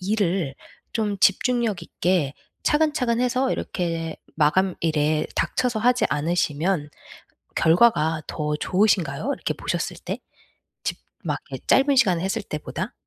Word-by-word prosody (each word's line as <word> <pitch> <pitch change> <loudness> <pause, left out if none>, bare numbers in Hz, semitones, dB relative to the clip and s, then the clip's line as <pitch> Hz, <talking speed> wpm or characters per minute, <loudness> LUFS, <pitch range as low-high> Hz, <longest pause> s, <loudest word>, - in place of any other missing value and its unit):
일을 185 -7 0 0.4
좀 210 -3 -1
집중력 220 -1 +2
있게 170 -4 0 0.3
차근차근 295 -6 +2
해서 255 +1 +1
이렇게 165 -3 -3 0.2
마감일에 155 -2 +2
닥쳐서 250 -3 0
하지 245 +2 +3
않으시면 155 +1 0 0.7
결과가 160 -3 +4
더 150 -1 -2
좋으신가요? 185 - +1
이렇게 - - -3
보셨을 - - -3
때? - - -3 0.7
집 - - -2 0.3
막 - - -1
이 - - -4
짧은 275 +1 +4
시간에 185 -10 +4
했을 190 - -1
때보다? 165 +7 -5
185 Hz, 270 characters per minute, -24 LUFS, 160-235 Hz, 0.7 s, 결과가